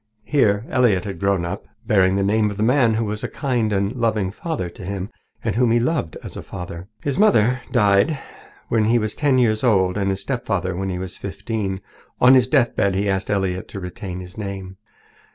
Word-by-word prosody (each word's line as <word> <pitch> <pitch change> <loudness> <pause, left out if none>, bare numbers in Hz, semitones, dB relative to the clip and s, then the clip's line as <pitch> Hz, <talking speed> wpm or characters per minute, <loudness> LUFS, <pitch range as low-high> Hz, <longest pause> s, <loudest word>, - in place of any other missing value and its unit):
Here 105 -7 +2
Elliott 115 -7 +2
had 100 -2 -5
grown 100 -3 +1
up, 100 +4 -5 0.2
bearing 95 -3 +3
the 100 - +1
name 105 +2 +2
of 100 - -6
the 105 - 0
man 120 -2 +3
who 115 0 0
was 105 0 -4
a - - -1
kind 120 -6 -1
and 100 +2 0
loving 110 -5 0
father 155 - -4
to 85 - -11
him, 100 +1 -4 0.3
and - - 0
whom 120 0 +3
he 120 +1 +4
loved 125 - -1
as - - -8
a - - -5
father. 90 0 -8 0.2
His 140 +2 -1
mother 165 - +6 0.2
had - - -22
died 105 +9 +3 0.5
when 110 -2 +2
he 115 +2 +4
was 110 -2 -1
ten 145 -3 +2
years 110 -3 +2
old 95 -6 +3
and 100 -1 0
his 95 0 -2
stepfather 100 -8 -2
when 95 +1 -2
he 90 - -2
was 90 -1 -6
fifteen. 100 0 -4 0.4
On 125 +1 +7
his 130 -2 +5
deathbed 110 -6 +2
he 100 +2 0
asked 95 -1 -1
Elliott 95 -2 -1
to 100 - -7
retain 90 0 -6
his 90 +2 -10
name. 95 -2 -6
100 Hz, 210 wpm, -21 LUFS, 95-115 Hz, 0.5 s, On